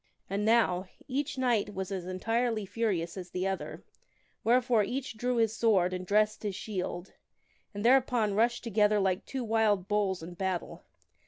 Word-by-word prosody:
And 200 Hz, +1 st, -1 dB
now 210 Hz, -5 st, +3 dB, 0.2 s
each 280 Hz, +1 st, -2 dB
knight 235 Hz, -6 st, +1 dB
was 190 Hz, 0 st, -4 dB
as 185 Hz, -2 st, -4 dB
entirely 225 Hz, +3 st, -1 dB
furious 190 Hz, -5 st, -2 dB
as 180 Hz, -1 st, -7 dB
the 185 Hz, +1 st, -3 dB
other, 195 Hz, 0 st, -4 dB, 0.6 s
wherefore, 240 Hz, -1 st, +3 dB
each 260 Hz, +3 st, -4 dB
drew 250 Hz, +2 st, -1 dB
his 225 Hz, -2 st, +2 dB
sword 195 Hz, -6 st, +3 dB
and 185 Hz, 0 st, -5 dB
dressed 215 Hz, +1 st, +2 dB
his 205 Hz, -3 st, -3 dB
shield, 180 Hz, -3 st, -5 dB, 0.6 s
and 205 Hz, +1 st, -5 dB
thereupon 245 Hz, -4 st, +3 dB
rushed 235 Hz, +3 st, +1 dB
together 210 Hz, -2 st, +3 dB
like 190 Hz, -1 st, 0 dB
two 265 Hz, -2 st, -3 dB
wild 215 Hz, -4 st, +2 dB
bulls 200 Hz, -4 st, 0 dB
in 175 Hz, +2 st, -8 dB
battle. 185 Hz, -1 st, -3 dB
210 Hz, 160 wpm, -30 LUFS, 190-230 Hz, 0.6 s, now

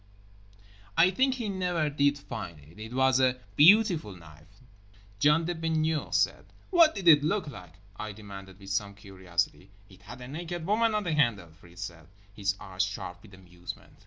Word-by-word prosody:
I 180 Hz, +2 st, +6 dB
think 260 Hz, +6 st, +2 dB
he 235 Hz, -4 st, -4 dB
never 180 Hz, -5 st, -1 dB
did 140 Hz, 0 st, +2 dB
find 115 Hz, -, -8 dB
it. 75 Hz, +7 st, -17 dB
It 110 Hz, +1 st, -8 dB
was 130 Hz, 0 st, +3 dB
a 130 Hz, -1 st, +2 dB, 0.2 s
"beautiful" 175 Hz, -, +5 dB
knife, 80 Hz, +6 st, -17 dB, 0.6 s
John 150 Hz, +5 st, +4 dB
the 175 Hz, -, -1 dB
Baigneur 160 Hz, -1 st, -1 dB
said. -, -, +1 dB, 0.3 s
"What 335 Hz, -4 st, +6 dB
did 195 Hz, -4 st, -4 dB
it 150 Hz, -3 st, +8 dB
look 180 Hz, +2 st, 0 dB
like?" 90 Hz, -, -11 dB, 0.2 s
I 110 Hz, -2 st, -5 dB
demanded 100 Hz, -2 st, -11 dB
with 100 Hz, -1 st, -10 dB
some 100 Hz, 0 st, -2 dB
curiosity. 95 Hz, -2 st, -4 dB, 0.2 s
"It 95 Hz, -1 st, -18 dB
had 110 Hz, +5 st, -11 dB
a 125 Hz, -, -8 dB
naked 165 Hz, +4 st, -6 dB
woman 220 Hz, +3 st, +2 dB
on 210 Hz, -, 0 dB
the 170 Hz, -4 st, -1 dB
handle" 115 Hz, -, +1 dB
Fritz 85 Hz, +2 st, -11 dB
said, 85 Hz, -4 st, -9 dB, 0.3 s
his 100 Hz, 0 st, -1 dB
eyes 95 Hz, -2 st, -4 dB
sharp 95 Hz, -2 st, -4 dB
with 100 Hz, -3 st, -15 dB
amusement. 90 Hz, -1 st, -11 dB
120 Hz, 175 wpm, -28 LUFS, -, 0.6 s, it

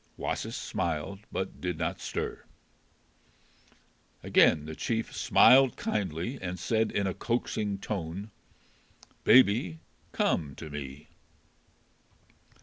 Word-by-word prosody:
Wasis -, -, -3 dB
smiled, 85 Hz, +4 st, -3 dB
but 95 Hz, -, -4 dB
did 90 Hz, -2 st, -2 dB
not -, -, -2 dB
stir. -, -, -4 dB, 1.8 s
Again 75 Hz, -, +4 dB
the 80 Hz, -, -6 dB
chief 115 Hz, +5 st, -2 dB
smiled 130 Hz, +1 st, +6 dB
kindly 95 Hz, -, -2 dB
and 90 Hz, 0 st, -4 dB
said 110 Hz, +3 st, 0 dB
in 100 Hz, -, 0 dB
a 95 Hz, -, -1 dB
coaxing 110 Hz, -3 st, -2 dB
tone, 95 Hz, +1 st, -5 dB, 0.9 s
"Baby, 100 Hz, -9 st, +5 dB, 0.3 s
come 75 Hz, -5 st, 0 dB
to 80 Hz, -2 st, -9 dB
me." 70 Hz, 0 st, -8 dB
95 Hz, 100 wpm, -29 LUFS, 80-110 Hz, 1.8 s, smiled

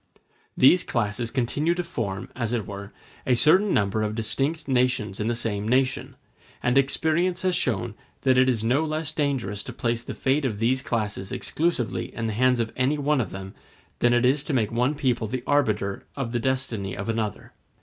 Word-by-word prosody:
These 170 Hz, +7 st, +6 dB
classes 115 Hz, 0 st, -1 dB
continue 145 Hz, +7 st, 0 dB
to 180 Hz, -, -2 dB
form, 100 Hz, -, -4 dB
as 120 Hz, -2 st, -2 dB
it 115 Hz, -4 st, -1 dB
were, 100 Hz, +1 st, -8 dB, 0.4 s
a 125 Hz, -, +4 dB
certain 185 Hz, -, +4 dB
number 100 Hz, +1 st, +1 dB
of 105 Hz, 0 st, -1 dB
distinct 140 Hz, +8 st, -2 dB
nations 125 Hz, -6 st, +1 dB
in 105 Hz, -, -1 dB
the 120 Hz, -, +1 dB
same 105 Hz, -3 st, -2 dB
nation; 130 Hz, +2 st, +1 dB, 0.5 s
and 120 Hz, +1 st, +2 dB
experience 160 Hz, +6 st, +2 dB
has 185 Hz, -1 st, +2 dB
shown 120 Hz, -, -1 dB, 0.3 s
that 130 Hz, -1 st, +3 dB
it 130 Hz, +1 st, +4 dB
is 115 Hz, -4 st, 0 dB
no 130 Hz, +7 st, +2 dB
less 155 Hz, 0 st, -2 dB
dangerous 130 Hz, -10 st, -1 dB
to -, -, -6 dB
place 115 Hz, -1 st, -1 dB
the -, -, -7 dB
fate 135 Hz, +3 st, +1 dB
of 115 Hz, -6 st, -1 dB
these 125 Hz, +4 st, +1 dB
classes 105 Hz, -6 st, -2 dB
exclusively 160 Hz, -7 st, -1 dB
in 115 Hz, -, -3 dB
the 110 Hz, -, -1 dB
hands 125 Hz, +2 st, +3 dB
of 115 Hz, -1 st, -2 dB
any 130 Hz, +4 st, +1 dB
one 145 Hz, -1 st, +1 dB
of 105 Hz, -, -3 dB
them 95 Hz, +1 st, -8 dB, 0.5 s
than 120 Hz, -, +4 dB
it 120 Hz, +1 st, +3 dB
is 135 Hz, +3 st, +3 dB
to 155 Hz, -, -2 dB
make 110 Hz, -4 st, +1 dB
one 125 Hz, +5 st, +1 dB
people 125 Hz, -5 st, 0 dB
the 125 Hz, +3 st, -4 dB
arbiter 105 Hz, -9 st, 0 dB
of 135 Hz, -5 st, -3 dB
the 120 Hz, -, 0 dB
destiny 115 Hz, -6 st, -2 dB
of 100 Hz, -, -5 dB
another. 110 Hz, -2 st, -3 dB
120 Hz, 195 wpm, -25 LUFS, 110-140 Hz, 0.5 s, These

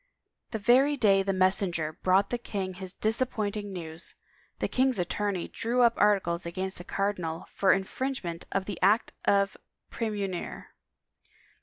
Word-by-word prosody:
The 220 Hz, -, -3 dB
very 260 Hz, +7 st, +4 dB
day 200 Hz, -5 st, +5 dB
the 195 Hz, 0 st, 0 dB
messenger 185 Hz, -4 st, +1 dB
brought 190 Hz, +4 st, +2 dB
the 245 Hz, -, -1 dB
king 195 Hz, -5 st, -4 dB
his 185 Hz, 0 st, -6 dB
disappointing 215 Hz, -2 st, -1 dB
news, 165 Hz, -2 st, -6 dB, 0.4 s
the -, -, -1 dB
king's 260 Hz, -2 st, +2 dB
attorney 190 Hz, 0 st, -1 dB
drew 245 Hz, +2 st, +1 dB
up 235 Hz, -1 st, +5 dB
articles 190 Hz, -5 st, +2 dB
against 185 Hz, +2 st, -3 dB
the -, -, -7 dB
cardinal 185 Hz, -4 st, -2 dB
for 195 Hz, -, +4 dB
infringement 190 Hz, -3 st, -2 dB
of 195 Hz, -1 st, 0 dB
the 200 Hz, -2 st, -5 dB
Act 205 Hz, +5 st, +3 dB
of 200 Hz, -1 st, +3 dB, 0.4 s
Praemunire. 205 Hz, -6 st, -3 dB
195 Hz, 140 wpm, -28 LUFS, 185-220 Hz, 0.4 s, day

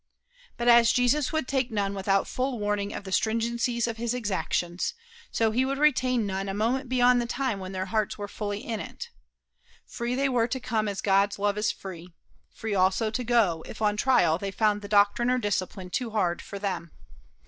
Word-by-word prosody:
But 240 Hz, -, -2 dB
as 235 Hz, -1 st, +7 dB
Jesus 255 Hz, +3 st, +2 dB
would 315 Hz, -5 st, -1 dB
take 265 Hz, -2 st, 0 dB
none 200 Hz, -2 st, -1 dB
without 195 Hz, 0 st, +1 dB
full 255 Hz, 0 st, -2 dB
warning 205 Hz, -1 st, -1 dB
of -, -, -6 dB
the 190 Hz, -, -8 dB
stringency 235 Hz, +3 st, 0 dB
of 230 Hz, -1 st, -4 dB
his 235 Hz, +1 st, -1 dB
exactions, 185 Hz, -, -2 dB, 0.3 s
so 225 Hz, -1 st, +1 dB
he 245 Hz, +4 st, +2 dB
would 270 Hz, +1 st, -1 dB
retain 255 Hz, -5 st, +2 dB
none 195 Hz, 0 st, -3 dB
a 195 Hz, -, -3 dB
moment 245 Hz, +5 st, 0 dB
beyond 250 Hz, -1 st, +4 dB
the 235 Hz, -, -3 dB
time 245 Hz, -4 st, -1 dB
when 185 Hz, 0 st, -6 dB
their 185 Hz, -1 st, -3 dB
hearts 215 Hz, +1 st, -1 dB
were 205 Hz, -1 st, -5 dB
fully 205 Hz, 0 st, -5 dB
in 225 Hz, -2 st, -3 dB
it. -, -, -8 dB, 0.7 s
Free 240 Hz, +1 st, -3 dB
they 275 Hz, +1 st, +1 dB
were 240 Hz, -3 st, +2 dB
to 260 Hz, +2 st, -3 dB
come 225 Hz, -4 st, -1 dB
as 200 Hz, -1 st, -3 dB
God's 200 Hz, 0 st, +2 dB
love 205 Hz, 0 st, 0 dB
is 210 Hz, 0 st, +1 dB
free 175 Hz, -2 st, -10 dB, 0.4 s
free 220 Hz, -2 st, -4 dB
also 195 Hz, +3 st, +2 dB
to 250 Hz, +3 st, -2 dB
go, 215 Hz, -9 st, +2 dB
if -, -, -9 dB
on 210 Hz, -1 st, +2 dB
trial 210 Hz, -9 st, +3 dB
they 200 Hz, -, -3 dB
found 210 Hz, +1 st, +1 dB
the 205 Hz, -, -7 dB
doctrine 205 Hz, +4 st, +3 dB
or 255 Hz, -, +3 dB
discipline 190 Hz, -4 st, -3 dB
too 245 Hz, +2 st, -2 dB
hard 185 Hz, -6 st, 0 dB
for 200 Hz, -, -8 dB
them. 195 Hz, -4 st, -3 dB
215 Hz, 205 wpm, -27 LUFS, 200-245 Hz, 0.7 s, as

